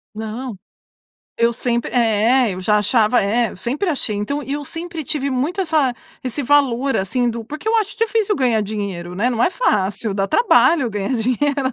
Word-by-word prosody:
Não. 220 +2 -5 0.8
Eu 235 0 +2
sempre 235 0 -1
é, 230 0 +3
eu 185 - -6
já 210 +3 +2
achava, 215 +2 +3
é, 220 +3 +1
eu - - -11
sempre 270 - -2
achei. 265 -9 -1
Então 210 +9 -2
e 275 -1 -6
eu 290 0 -3
sempre 330 +2 -4
tive 280 0 -2
muito 285 +9 -1
essa 310 -7 +1 0.3
esse 260 +2 -3
valor 275 -1 +2
assim 240 +6 0
do 230 -1 -4
porque 305 - -6
eu 450 - +1
acho 425 -2 -1
difícil 440 -2 +1
ganhar 240 -5 +2
dinheiro, 195 -4 -5
né, 225 +6 +1
não 240 -2 0
é - - +3
fácil 205 - 0
dar 195 0 -1
trabalho 330 - +4
ganhar 210 +4 -2
dinheiro, 260 +3 0
245 Hz, 185 wpm, -19 LUFS, 215-290 Hz, 0.8 s, trabalho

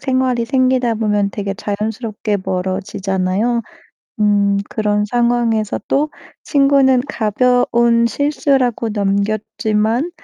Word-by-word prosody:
생활이 255 -2 0
생기다 255 -1 +1
보면 210 -2 0
되게 200 -1 -4
자연스럽게 215 +1 -3
멀어지잖아요. 190 +4 -1 0.6
음 200 -1 +2
그런 210 -1 0
상황에서 235 -2 0
또 295 +2 +1 0.3
친구는 275 -3 +3
가벼운 235 +1 +2
실수라고 270 -4 0
넘겼지만 215 - -1
225 Hz, 250 characters per minute, -17 LUFS, 205-250 Hz, 0.6 s, 친구는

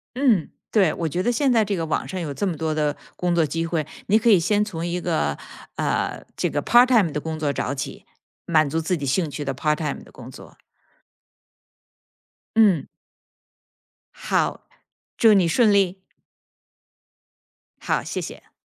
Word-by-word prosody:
嗯， 245 - +2 0.2
对， 190 -8 +3
我 165 - -2
觉 175 +4 -2
得 240 - +2
现 260 +3 +1
在 230 -2 +4
这 205 -1 -2
个 165 - -2
网 155 - -1
上 190 - -5
有 155 -5 -4
这 140 - -2
么 175 -5 -2
多 160 -1 -2
的 150 -1 0 0.2
工 180 -1 -1
作 170 -2 +3
机 165 +3 -2
会， 165 -2 -1 0.2
你 215 +2 +4
可 235 - +2
以 205 - +7
先 205 +5 +2
从 170 -6 -5
一 175 +1 -2
个， 170 -3 -1 0.4
呃， - - -1
这 - - -1
个 - - -1
PartTime 240 -8 +5
的 150 - -2
工 160 0 -5
作 145 -2 0
找 135 - -2
起， 135 - -6 0.4
满 155 -3 +3
足 165 +3 -1
自 175 +3 -1
己 145 - -4
兴 150 +4 0
趣 145 +1 -5
的 135 -1 -2
PartTime 150 +1 -1
的 - - -17
工 - - -11
作。 - - -14 2.0
嗯。 205 -9 +4 1.3
好， - - -1 0.5
祝 225 -2 +6
你 190 -4 +4
顺 215 +5 +4
利。 190 -1 +1 1.8
好， - - 0
谢 - - -4
谢。 - - -10
170 Hz, 225 characters per minute, -23 LUFS, 155-205 Hz, 2.0 s, 以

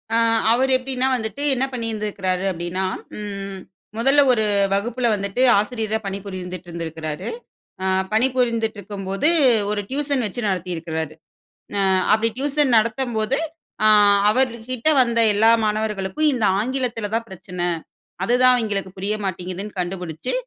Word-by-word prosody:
அ - - +4 0.3
அவர் 260 +3 +2
எப்டீன்னா, 255 0 0
வந்துட்டு 220 +4 -4
என்ன 260 +1 0
பண்ணிருந்திருக்கிறாரு 210 -6 -2
அப்டீன்னா, 175 +2 -3 0.3
ம் 200 -2 -6 0.4
மொதல்ல 270 +5 +4
ஒரு 220 -3 +2 0.3
வகுப்புல 235 +4 0
வந்துட்டு 200 +3 -2 0.2
ஆசிரியரா 220 0 -1
பணிபுரிந்துட்டு 185 -2 -6
இருந்திருக்காரு. 160 -2 -5 0.6
அ - - 0 0.3
பணிபுரிந்துட்ருக்கும்போது 225 - 0 0.4
ஒரு 210 -1 -1
டியூஷன் 280 -3 0
வச்சு 210 +5 -5
நடத்திருக்கிறாரு. 165 -4 -3 0.6
அ - - +3 0.3
அப்டி 220 +1 +1
டியூஷன் 280 -2 +1
நடத்தும்போது 230 +2 0 0.5
அ - - +7 0.4
அவர்க்கிட்ட 250 +1 -1
வந்த 235 -1 +1
எல்லா 220 +2 +5
மாணவர்களுக்கும் 215 +7 0
இந்த 230 - -1 0.2
ஆங்கிலத்துல 235 -3 -2
தான் 230 0 -1
பிரச்சனை. 180 -2 -4 0.6
அதுதான் 250 +2 +4
எங்களுக்கு 195 -3 -3
புரிய 205 +3 -1
மாட்டேங்குதுன்னு 185 +2 -5
கண்டுபிடிச்சு 175 - -4
215 Hz, 115 wpm, -22 LUFS, 190-245 Hz, 0.6 s, அ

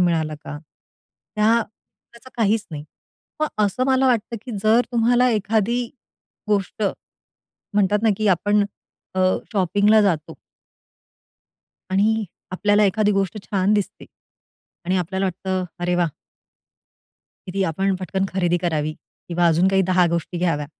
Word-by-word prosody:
मिळालं 160 -3 +1
का? 145 - -6 0.8
त्या 225 +2 +3 0.5
त्याचं 235 +2 -15
काहीच 220 -1 +1
नाही. 150 -1 -6 0.6
मग 310 - +2 0.2
असं 250 +6 0
मला 265 0 +3
वाटतं 235 -1 0
की 255 - -7
जर 220 +3 +5
तुम्हाला 240 +2 +3
एखादी 220 +3 0 0.6
गोष्ट, 205 +1 -1 0.9
म्हणतात 205 0 +3
ना 225 - +4
की 215 -1 0
आपण 205 +3 +2 0.5
अ, 185 - +2 0.3
शॉपिंगला 205 +3 +3
जातो 165 -5 0 1.6
आणि 215 +3 +2 0.3
आपल्याला 205 +2 +2
एखादी 210 +1 +2
गोष्ट 195 +1 -1
छान 195 0 +1
दिसते 205 -2 -2 0.8
आणि 185 +2 +1
आपल्याला 190 +2 -1
वाटतं, 185 0 -2 0.2
अरे 175 0 0
वा! 175 -1 +2 1.4
की 185 - -5
ती 195 0 0
आपण 190 +3 0
पटकन 190 +1 -2
खरेदी 175 -2 +1
करावी 155 -3 -1 0.3
किंवा 175 0 +2
अजून 170 +3 +3
काही 190 0 +3
दहा 180 -1 +4
गोष्टी 170 +1 -3
घ्याव्या. 165 -5 0
195 Hz, 130 wpm, -22 LUFS, 180-215 Hz, 1.6 s, जर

